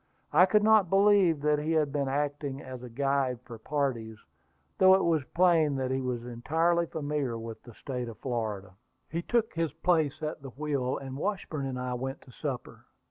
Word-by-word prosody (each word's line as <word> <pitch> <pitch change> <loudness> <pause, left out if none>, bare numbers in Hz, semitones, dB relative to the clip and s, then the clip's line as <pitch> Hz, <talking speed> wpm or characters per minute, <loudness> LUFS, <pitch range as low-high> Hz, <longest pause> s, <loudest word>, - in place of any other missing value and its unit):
I 180 - +7
could 210 +2 +3
not 215 -4 +5
believe 195 -5 +4
that 150 0 +2
he 155 +2 -1
had 155 -3 +2
been 140 -2 0
acting 145 0 -2
as 130 -2 -8
a 125 - -8
guide 135 0 0
for 115 -3 -9
parties, 120 -5 -2 0.6
though 190 0 +8
it 190 - +1
was 165 -4 +2
plain 165 -5 +4
that 130 -1 -1
he 130 0 0
was 125 -2 -3
entirely 165 +8 +1
familiar 145 -6 -2
with 115 0 -7
the 120 -3 -14
State 125 -3 -5
of 115 - -10
Florida. 110 -6 -3 0.4
The 165 +2 -1
pilot - - -27
took 235 -2 +1
his 165 -3 -1
place 160 -2 +1
at 155 -1 -3
the 135 - -8
wheel, 140 -2 -2
and 135 -1 -7
Washburn 155 -6 -3
and 130 -1 -4
I 125 0 -3
went 135 +3 -4
to 130 - -16
supper. 130 -1 -6
140 Hz, 195 wpm, -29 LUFS, 125-165 Hz, 0.6 s, though